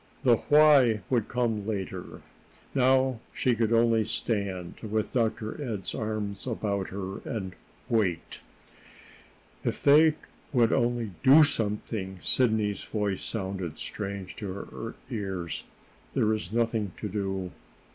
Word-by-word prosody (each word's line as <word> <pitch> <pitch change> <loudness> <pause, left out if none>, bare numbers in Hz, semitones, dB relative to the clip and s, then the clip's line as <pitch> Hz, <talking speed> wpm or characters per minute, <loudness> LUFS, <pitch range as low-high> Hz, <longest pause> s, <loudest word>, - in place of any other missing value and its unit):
The 120 -4 +5
why 145 -7 +6
would 120 -4 +2
come 115 -4 -1
later. 100 -4 -5 0.5
Now 130 -2 +3 0.2
she 125 - +2
could 115 -1 0
only 115 -1 +4
stand, 100 -5 -2
with 110 -1 -2
Dr. 115 +2 -1
Ed's 110 -7 -4
arms 105 -1 -3
about 100 -5 -2
her, 95 0 -5
and 95 -5 -5 0.3
wait. 100 -8 0 1.2
"If - - -2
they 155 +2 +6 0.4
would 120 -5 +3
only 120 -3 +1
do 145 +4 +8
something!" 105 -7 -1
Sidney's 110 -2 +2
voice 105 -3 -2
sounded 95 -6 -4
strange 100 -2 -5
to 100 -4 -4
her 110 +3 -7 0.2
ears. 95 -7 -4 0.5
"There 110 0 +3
is 105 -5 -4
nothing 115 -4 0
to 105 - -4
do." 95 -2 -3
110 Hz, 120 wpm, -28 LUFS, 100-120 Hz, 1.2 s, do